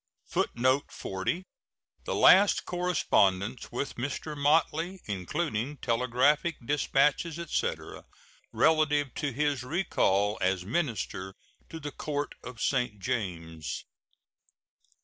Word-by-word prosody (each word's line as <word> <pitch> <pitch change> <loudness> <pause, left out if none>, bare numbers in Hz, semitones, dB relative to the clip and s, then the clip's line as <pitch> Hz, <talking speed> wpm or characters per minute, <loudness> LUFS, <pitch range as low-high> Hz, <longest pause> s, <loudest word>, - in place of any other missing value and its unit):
[Footnote 130 +3 +1
40: 95 - -3 0.6
The - - -2
last 195 +2 +6
correspondence 125 - +1
with 125 +4 -4
Mr. 145 +4 -4
Motley, 160 +5 +1
including 110 - -2
telegraphic 125 +7 +2
dispatches, 145 +3 +1
etc., 170 -2 -3 0.5
relative 150 -4 +2
to 145 - -2
his 145 +1 0
recall 110 - +1
as 90 -1 +1
minister 105 - -2 0.3
to 165 - -7
the 145 -1 -6
Court 145 -1 -3
of 125 -1 -9
St. 125 -5 0
James. 85 -6 -4
135 Hz, 95 wpm, -29 LUFS, 105-155 Hz, 0.6 s, last